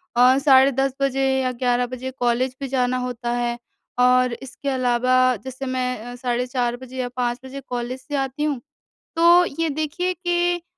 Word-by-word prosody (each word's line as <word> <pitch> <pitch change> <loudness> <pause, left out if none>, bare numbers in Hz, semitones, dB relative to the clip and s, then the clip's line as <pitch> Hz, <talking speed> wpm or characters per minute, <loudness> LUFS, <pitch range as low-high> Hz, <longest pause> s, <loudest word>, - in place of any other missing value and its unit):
अ, 250 +2 +6
साढ़े 275 -1 +5
10 270 0 0
बजे 270 0 +1 0.2
या 255 -1 0
11 245 0 0
बजे 255 +1 -6
कॉलेज 250 0 0
भी 275 - -2
जाना 255 -1 0
होता 245 -1 -3
है 240 0 -1 0.4
और 250 0 +4
इसके 270 +2 -6
अलावा 255 0 +2
जैसे 260 +1 -6
मैं 255 -1 -2
अ, - - -8
साढ़े 245 0 -1
4 245 -1 -1
बजे 260 0 -11
या 255 -1 -1
5 245 0 -1
बजे 275 +1 -7
कॉलेज 245 +1 -4
से 290 +2 -6
आती 270 +2 -2
हूँ 290 -5 0 0.6
तो 340 +2 +6 0.2
ये 330 - +2
देखिए 315 +5 -2
कि 350 0 0
255 Hz, 180 wpm, -22 LUFS, 245-275 Hz, 0.6 s, अ